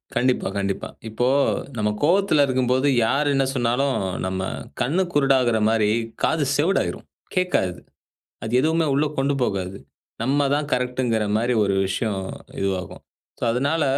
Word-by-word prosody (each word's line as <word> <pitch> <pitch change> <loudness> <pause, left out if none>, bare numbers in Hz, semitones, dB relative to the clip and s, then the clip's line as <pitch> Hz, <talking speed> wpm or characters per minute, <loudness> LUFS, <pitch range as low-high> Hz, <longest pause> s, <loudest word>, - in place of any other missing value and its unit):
கண்டிப்பா, 125 -4 +1
கண்டிப்பா. 100 -1 -2 0.2
இப்போ 120 +3 0 0.5
நம்ம 105 -1 +1
கோபத்தில 175 -2 +4
இருக்கும்போது 130 +1 +1 0.2
யார் 145 +6 +1
என்ன 135 -1 +2
சொன்னாலும் 130 +2 +1 0.3
நம்ம 95 0 -2 0.4
கண்ணு 175 +9 +2
குருடாகிறமாரி 115 -6 +3 0.3
காது 160 -2 +2
செவிடாயிரும். 175 +7 0 0.3
கேட்காது. 175 - 0 0.6
அது 110 +2 -4
எதுவுமே 160 +3 +2
உள்ளே 150 +2 +2
கொண்டு 140 +1 +1
போகாது. 95 -4 -2 0.5
நம்ம 140 +2 +2
தான் 150 0 -2
கரெக்ட்ங்கிற 125 -3 0
மாரி 120 +2 +1
ஒரு 100 -1 +1
விஷயம் 100 0 -2 0.4
இதுவாகும். 95 -2 -3 0.4
சோ, - - -5
அதுனால 145 +6 +1
125 Hz, 125 wpm, -23 LUFS, 110-145 Hz, 0.6 s, கோபத்தில